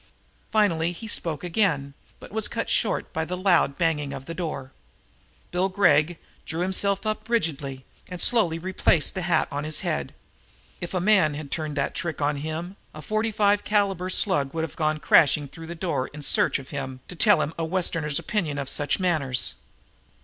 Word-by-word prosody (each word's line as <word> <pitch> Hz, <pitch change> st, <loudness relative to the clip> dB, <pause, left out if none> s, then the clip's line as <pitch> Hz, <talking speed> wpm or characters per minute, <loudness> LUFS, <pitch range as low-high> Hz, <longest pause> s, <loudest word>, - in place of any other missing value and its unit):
Finally 175 Hz, -6 st, +2 dB
he 220 Hz, +6 st, -8 dB
spoke 165 Hz, -7 st, -1 dB
again, 165 Hz, -7 st, 0 dB, 0.3 s
but -, -, -12 dB
was 220 Hz, +1 st, 0 dB
cut 230 Hz, -, -3 dB
short 220 Hz, -, 0 dB
by 160 Hz, -, -1 dB
the 180 Hz, +3 st, -4 dB
loud 175 Hz, -7 st, +3 dB
banging 150 Hz, -5 st, 0 dB
of 135 Hz, -1 st, -7 dB
the 165 Hz, -, -5 dB
door. 150 Hz, -7 st, -4 dB, 0.8 s
Bill 180 Hz, +2 st, +1 dB
Gregg 175 Hz, -4 st, +3 dB, 0.3 s
drew 165 Hz, +2 st, -4 dB
himself 195 Hz, +2 st, 0 dB
up 215 Hz, +1 st, -3 dB
rigidly 145 Hz, -, -1 dB, 0.2 s
and 180 Hz, -1 st, -6 dB
slowly 190 Hz, -9 st, +2 dB
replaced 175 Hz, -2 st, +2 dB
the 190 Hz, -, -3 dB
hat 170 Hz, -2 st, +2 dB
on 145 Hz, +1 st, -3 dB
his 155 Hz, 0 st, 0 dB
head. 70 Hz, -2 st, -2 dB, 0.6 s
If -, -, -5 dB
a -, -, +2 dB
man 180 Hz, -6 st, +4 dB
had 145 Hz, -2 st, -7 dB
turned 155 Hz, -2 st, -2 dB
that 140 Hz, -, 0 dB
trick 170 Hz, -1 st, -3 dB
on 145 Hz, 0 st, +1 dB
him, 160 Hz, +6 st, -5 dB, 0.2 s
a 155 Hz, -, -8 dB
.45 215 Hz, 0 st, +1 dB
caliber 195 Hz, -3 st, +1 dB
slug 165 Hz, -8 st, +1 dB
would 160 Hz, -, 0 dB
have 160 Hz, -, -5 dB
gone 155 Hz, -1 st, 0 dB
crashing 150 Hz, -1 st, +4 dB
through 165 Hz, +4 st, -11 dB
the 170 Hz, -, -6 dB
door 165 Hz, -7 st, -1 dB
in 150 Hz, 0 st, -10 dB
search -, -, +3 dB
of 135 Hz, -1 st, -11 dB
him 135 Hz, -2 st, -5 dB
to 180 Hz, -, -9 dB
teach -, -, +2 dB
him 155 Hz, -, -1 dB
a -, -, 0 dB
Westerner's 165 Hz, -3 st, +1 dB
opinion 165 Hz, -9 st, -2 dB
of 140 Hz, -2 st, -3 dB
such 145 Hz, -1 st, 0 dB
manners. 155 Hz, -9 st, 0 dB
165 Hz, 185 wpm, -25 LUFS, 145-190 Hz, 0.8 s, man